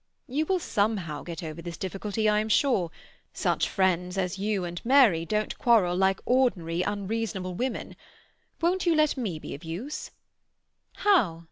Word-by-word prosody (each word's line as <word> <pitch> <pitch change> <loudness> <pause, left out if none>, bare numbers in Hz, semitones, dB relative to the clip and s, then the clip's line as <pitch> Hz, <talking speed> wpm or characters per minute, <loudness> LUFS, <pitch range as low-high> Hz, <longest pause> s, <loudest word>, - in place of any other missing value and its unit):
"You 300 +5 -1
will 380 - +2
somehow 200 - -1
get 170 -1 -7
over 160 +1 -6
this 170 0 -7
difficulty, 205 +3 -2
I 210 0 +4
am 215 +1 -2
sure. 215 - +2 0.4
Such - - 0
friends 180 -1 +1
as 190 0 -1
you 200 -2 -1
and 175 0 -6
Mary 230 -11 +5
don't 215 0 -1
quarrel 215 -8 +4
like 190 +1 +2
ordinary 185 -10 +1
unreasonable 200 -1 -2
women. 250 +7 -3 0.6
Won't 360 +2 +1
you 335 - +4
let 305 -1 +3
me 215 - -3
be - - -7
of 145 - -9
use?" 185 - -5 0.8
"How?" 235 - +2
200 Hz, 155 wpm, -27 LUFS, 175-245 Hz, 0.8 s, Mary